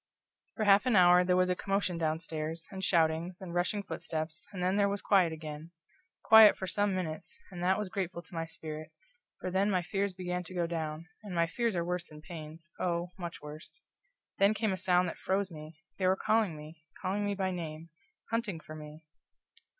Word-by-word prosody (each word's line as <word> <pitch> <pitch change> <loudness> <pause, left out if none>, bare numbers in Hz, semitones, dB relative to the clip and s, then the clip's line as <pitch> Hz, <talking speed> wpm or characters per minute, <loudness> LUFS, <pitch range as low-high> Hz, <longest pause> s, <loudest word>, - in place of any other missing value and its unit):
For 220 - -1
half 205 +3 +5
an 245 - +4
hour 180 -1 +7
there 180 0 +2
was 185 0 +3
a - - +1
commotion 195 -3 -1
downstairs, 160 0 -2
and 190 -1 -6
shoutings, 170 0 +2
and 185 -3 -7
rushing 180 +4 0
footsteps, 160 -3 -4
and 185 -3 -4
then 185 +2 +2
there 200 -1 +3
was 200 0 -2
quiet 190 -5 +4
again. 155 0 -7 0.5
Quiet 220 -1 +9
for 190 - -3
some 205 +2 +1
minutes, 160 -4 -4
and 175 -2 -7
that 185 +2 +3
was 210 -1 -2
grateful 180 -2 -3
to 175 - -18
my 165 -1 -2
spirit, 155 -1 -6 0.5
for 185 - -4
then 195 +3 +2
my 185 -3 +1
fears 195 +1 -1
began 180 -1 -3
to 185 - -9
go 175 -1 +1
down; 160 -1 -4
and 175 -5 -1
fears 235 -4 0
are 170 -1 0
worse 180 0 -2
than 150 - -12
pains 165 0 -9
oh, 175 0 -1
much 170 -4 -6
worse. 155 - -8 0.6
Then 200 +2 +5
came 215 -2 0
a - - 0
sound 180 -1 +3
that - - -6
froze 195 0 0
me. 155 0 -10 0.2
They 185 - +2
were 185 - +4
calling 215 -5 +1
me 155 +1 -11 0.2
calling 195 +2 -1
me 205 0 0
by 190 -1 0
name 165 -2 -6 0.4
hunting 230 -7 -1
for 155 - -11
me! 155 +1 -10
180 Hz, 200 wpm, -31 LUFS, 160-195 Hz, 0.6 s, Quiet